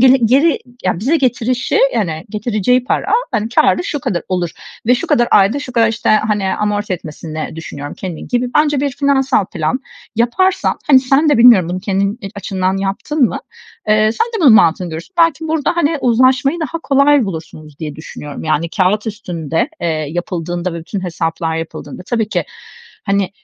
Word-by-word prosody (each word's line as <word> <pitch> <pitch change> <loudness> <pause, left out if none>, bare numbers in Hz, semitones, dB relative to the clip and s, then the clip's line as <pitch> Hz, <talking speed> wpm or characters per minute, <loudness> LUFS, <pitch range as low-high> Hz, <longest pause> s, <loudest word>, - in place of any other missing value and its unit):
geli 255 -2 +5
geri 280 +7 +3 0.3
Ya, 180 -2 0
bize 280 +10 +2
getirişi, 250 -2 0 0.2
yani, 170 -8 -2
getireceği 220 +3 0
para, - - -1 0.2
hani, 220 -2 -1
kârı 310 +6 +2
şu 290 - -3
kadar 175 -8 -2
olur. 180 -2 -1 0.4
Ve 250 - +5
şu 245 - -3
kadar 240 0 +2
ayda 200 +7 +4
şu 275 -3 -7
kadar, 230 -2 +3
işte, 225 0 -2
hani, 210 -3 +2
amorti 210 -1 -1
etmesini 155 -1 -6
düşünüyorum 145 -3 -7
kendini." 180 -4 -7
gibi 245 0 0
bence 295 -2 +3
bir 285 -1 0
finansal 270 -4 +1
plan 165 +9 -2 0.4
yaparsan, 350 +12 +1
hani, 265 -3 +6
sen 275 +4 +2
de 290 - +3
bilmiyorum 230 -8 +7
bunu 185 +1 -3
kendin 200 +3 -1
e - - -5
açından 190 -1 -2
yaptın 200 +10 -2
mı? - - -4 0.5
Eee, 215 +1 +3
sen 460 - 0
de 455 -4 -5
bunun 275 -7 +7
mantığını 175 -2 +3
görürsün. 165 - -8
Belki 320 -1 +2
burada, 320 +1 0
hani, 320 -2 +1
uzlaşmayı 255 +6 +2
daha 320 +2 -3
kolay 280 -3 +3
bulursunuz 160 -4 -8
diye 150 -3 -6
düşünüyorum. 150 -2 -8
Yani, 160 +1 0
kâğıt 205 +3 +1
üstünde, 180 - -3
eee, - - -1
yapıldığında 175 +3 -3
ve - - -4
bütün 190 +5 -5
hesaplar 165 -1 -2
yapıldığında 165 -1 -7
tabii 225 -3 -1
ki, - - -1 0.6
hani, 200 -2 0
215 Hz, 175 wpm, -16 LUFS, 175-260 Hz, 0.6 s, bilmiyorum